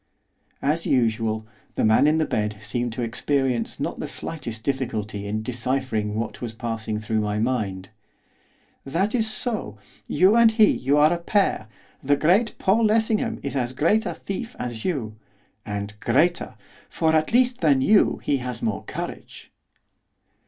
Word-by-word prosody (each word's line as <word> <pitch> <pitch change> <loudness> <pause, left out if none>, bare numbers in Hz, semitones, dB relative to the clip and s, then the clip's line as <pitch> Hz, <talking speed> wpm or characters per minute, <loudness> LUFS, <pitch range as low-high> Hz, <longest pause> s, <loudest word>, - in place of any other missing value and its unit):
As 155 +4 +1
usual, 115 -3 +1 0.3
the - - +1
man 110 +6 +5
in 155 +1 +3
the 160 - +2
bed 105 0 -2
seemed 120 +3 -2
to 120 - -3
experience 125 +1 -1
not - - -3
the - - -3
slightest 115 -9 -6
difficulty 110 -6 -3
in 110 +1 -2
deciphering 120 -3 -2
what 115 0 -4
was 115 -2 -5
passing 110 -2 -3
through 110 +1 -1
my 105 0 -1
mind. 105 -5 -2 0.9
'That 180 +10 -1
is 225 -3 +1
so, 215 - -3 0.3
you 190 +4 +4
and 230 -1 +6
he, 220 -2 +6
you 140 +3 +1
are 150 +3 +5
a 170 - -2
pair, 180 - +1 0.3
the 145 +1 +2
great 185 +11 +2
Paul 215 +4 +2
Lessingham 220 +2 +1
is 140 - -4
as 125 -2 -1
great 185 +11 +2
a - - -4
thief 230 +5 -6
as 120 -3 -5
you, 115 -11 -3 0.5
and 105 0 -4
greater! 160 +11 +1 0.3
for, 160 -1 +1
at 155 0 +1
least, 250 0 +2
than 145 -5 +4
you 205 +9 +4
he 140 - +1
has 125 -2 -6
more 110 -3 -1
courage. - - -7
130 Hz, 160 wpm, -24 LUFS, 110-175 Hz, 0.9 s, and